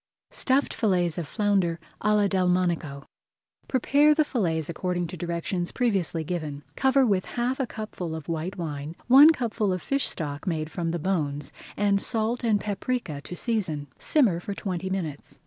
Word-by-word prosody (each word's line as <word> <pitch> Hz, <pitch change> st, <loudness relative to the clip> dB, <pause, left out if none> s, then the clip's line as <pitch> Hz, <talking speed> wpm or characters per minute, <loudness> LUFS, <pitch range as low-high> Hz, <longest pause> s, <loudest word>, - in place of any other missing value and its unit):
STUFFED 270 Hz, +2 st, +1 dB
FILLETS 180 Hz, -6 st, +1 dB
OF 165 Hz, -, -4 dB
FLOUNDER 195 Hz, -5 st, +1 dB, 0.2 s
À 210 Hz, +1 st, +3 dB
LA 205 Hz, -1 st, +4 dB
DELMONICO 180 Hz, -6 st, 0 dB, 0.6 s
Prepare 285 Hz, +4 st, +4 dB
the 310 Hz, -1 st, +3 dB
fillets 165 Hz, -, -1 dB
according 175 Hz, +1 st, -2 dB
to 175 Hz, +2 st, -6 dB
directions 175 Hz, +1 st, -2 dB
previously 195 Hz, -9 st, 0 dB
given. 155 Hz, -4 st, -4 dB
Cover 265 Hz, 0 st, +4 dB
with 195 Hz, -5 st, +1 dB
half 250 Hz, +2 st, -2 dB
a 265 Hz, -, 0 dB
cupful 200 Hz, -7 st, -5 dB
of 160 Hz, -2 st, -8 dB
white 165 Hz, +4 st, -3 dB
wine, 155 Hz, -2 st, -5 dB
one 275 Hz, +5 st, +9 dB
cupful 225 Hz, -8 st, -1 dB
of 185 Hz, -, -1 dB
fish 275 Hz, +8 st, 0 dB
stock 145 Hz, -2 st, -4 dB
made 160 Hz, -2 st, -2 dB
from 170 Hz, -2 st, -2 dB
the 170 Hz, -, -1 dB
bones, 150 Hz, -5 st, -2 dB, 0.2 s
and 200 Hz, -1 st, +2 dB
salt 225 Hz, +2 st, 0 dB
and 220 Hz, -3 st, +3 dB
paprika 200 Hz, -, -3 dB
to 180 Hz, -, -8 dB
season. 170 Hz, -, -2 dB
Simmer 230 Hz, -, +3 dB
for 200 Hz, +3 st, -5 dB
twenty 190 Hz, -2 st, -3 dB
minutes. 165 Hz, -7 st, -4 dB
185 Hz, 165 wpm, -26 LUFS, 165-220 Hz, 0.6 s, one